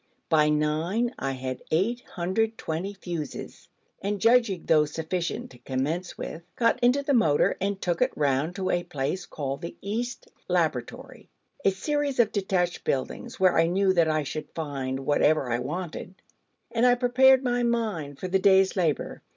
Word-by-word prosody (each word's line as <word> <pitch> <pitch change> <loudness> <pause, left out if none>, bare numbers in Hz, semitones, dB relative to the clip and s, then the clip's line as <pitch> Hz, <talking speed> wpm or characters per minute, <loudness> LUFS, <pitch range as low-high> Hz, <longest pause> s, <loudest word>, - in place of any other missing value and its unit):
By 150 -2 +4
nine 160 +11 0
I 135 0 -2
had 130 -1 -5
820 195 -1 -1
fuses; 170 -6 -6 0.3
and 200 +1 -2
judging 230 -5 +3
those 150 -2 +3
sufficient 165 +2 -3
to 125 - -15
commence 145 +8 -3
with, 160 - -6
got 230 -1 +2
into 250 +4 +3
the 280 0 +1
motor, 160 - +3
and 200 0 -1
took 175 -2 -1
it - - +3
round 145 +4 0
to 190 -2 -1
a 175 - +1
place 150 +6 -3
called 140 -2 -4
the 170 - -6
East 235 +5 -4 0.2
Laboratory, - - -2 0.3
a - - +5
series 285 +7 -1
of 225 -3 +4
detached 185 -3 -1
buildings, 175 - -3
where 185 -1 +4
I 165 - +4
knew 190 +2 +2
that 170 -3 +3
I 155 -1 +1
should 155 +2 -5
find 135 -4 -3
whatever 145 -1 +2
I 120 - +1
wanted: 175 +6 -5 0.6
and 230 0 0
I 245 0 +6
prepared 260 +2 +5
my 245 -1 +1
mind 215 - -1
for - - -7
a - - -3
day's 190 0 +4
labour. 170 -6 -1
180 Hz, 160 wpm, -26 LUFS, 150-225 Hz, 0.6 s, I